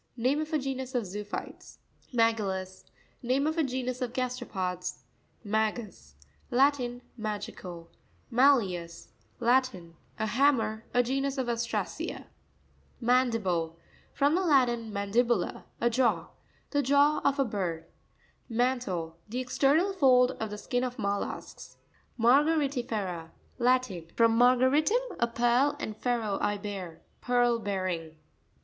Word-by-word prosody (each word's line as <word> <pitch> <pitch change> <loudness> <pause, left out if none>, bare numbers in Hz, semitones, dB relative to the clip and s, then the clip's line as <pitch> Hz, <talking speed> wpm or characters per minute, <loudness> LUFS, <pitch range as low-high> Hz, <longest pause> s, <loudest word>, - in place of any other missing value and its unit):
Name 260 +6 +1
of 310 +1 -5
a 310 - +2
genus 265 -2 -4
of 240 -3 0
zoophytes. 205 +2 -7 0.3
Ma'citus.—Name 225 +3 -1
of 315 +1 0
a 325 - +2
genus 255 -1 -3
of 245 -1 -2
gas 250 0 -2
teropods. 180 -6 -4 0.4
Ma'cus.—Latin. 220 - -1 0.2
Ma'tiEvs.—Latin. 205 +1 -1 1.1
genus 270 +2 -1
of 260 -2 -1
Ostracea. 235 0 -3 0.7
Ma'npiste.—From 230 - 0
the 365 - +2
Latin, 245 - +2
man 200 -1 -4
dibula, 235 -4 +1
a 235 - +2
jaw. 225 -9 +1 0.4
The 285 - +2
jaw 285 +2 +3
of 280 +1 +2
a 275 - +2
bird. 180 -7 -3 0.6
Man'tLte.—The 225 -5 -2
external 285 +9 +2
fold 255 -7 +5
of 220 - -3
the 210 - -6
skin 245 +4 -2
of 250 -1 -3
mollusks, 200 -1 -4 0.4
Ma'reariti'FerA.— 240 - +1 0.3
Latin. 245 -9 +1
From 230 -1 +4
mar 245 +2 +6
garitum, 310 - +2
a 235 - +3
pearl, 240 +5 +2
and 215 - -4
fero, 225 -4 -1
I 205 0 +1
bear. 195 -5 -7 0.2
Pearl 245 -1 +2
bearing. 185 -6 -3
240 Hz, 105 wpm, -29 LUFS, 200-260 Hz, 1.1 s, mar